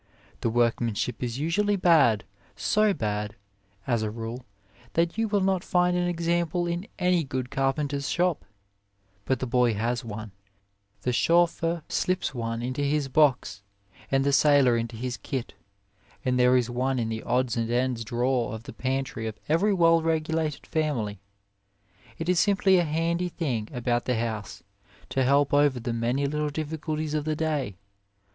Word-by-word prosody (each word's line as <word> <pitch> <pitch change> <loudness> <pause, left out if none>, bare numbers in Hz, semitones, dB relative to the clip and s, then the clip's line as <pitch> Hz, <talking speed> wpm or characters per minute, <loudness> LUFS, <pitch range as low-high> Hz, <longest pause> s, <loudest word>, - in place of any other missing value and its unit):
The - - 0
workman 115 -1 +1
ship 125 - -3
is 120 -1 -2
usually 205 +8 +1
bad, 155 - +4 0.3
so 215 0 +2
bad, 105 - -2 0.5
as 120 -3 +1
a 110 - -1
rule, 115 +2 -6 0.5
that 170 0 +1
you 225 0 0
will 205 -2 +1
not 190 -1 +1
find 180 0 +2
an 175 0 +1
example 170 0 0
in 175 +3 -3
any 180 -2 +2
good 130 -2 -4
car 135 0 +2
penter 145 0 -2
s 140 - -4
shop; 175 -3 0 0.8
but 130 - +1
the 130 - -3
boy 125 -2 +2
has 120 +3 -1
one, 110 -2 -7 0.7
the 125 - 0
chauffeur 170 +2 +2
slips 185 -4 -1
one 115 -1 -3
into 130 +3 -2
7 - - +1
A - - +1
WAY - - +1
his 145 -2 -1
box, 130 -8 +2 0.5
and 135 0 +2
the 140 0 +1
sailor 140 -3 +5
into 115 0 -3
his 120 +2 -4
kit, 130 -5 -5 0.7
and 125 -1 +1
there 125 +1 +5
is 125 -2 +1
one 130 +2 -1
in 115 -2 -1
the 110 0 -3
odds 125 -1 0
and 115 -1 -1
ends 120 -1 0
drawer 120 +1 0
of 110 - -9
the - - -9
pantry 130 -3 -2
of 110 -1 -6
every 165 +7 +3
well 165 -3 +4
regulated 160 -2 -1
family. 125 - -1 1.0
It 165 - -4
is 180 -1 +3
simply 195 -1 +4
a 175 - +1
handy 165 +3 0
thing 130 -11 -3
about 120 -1 -1
the 125 - +1
house, 110 -3 -4 0.5
to 135 - +1
help 140 +2 +3
over 145 -3 +4
the 120 0 -3
many 120 +4 0
little 150 +1 -1
difficulties 155 0 -3
of 150 -1 0
the 155 0 -1
day. 150 - -1
135 Hz, 175 wpm, -26 LUFS, 120-165 Hz, 1.0 s, sailor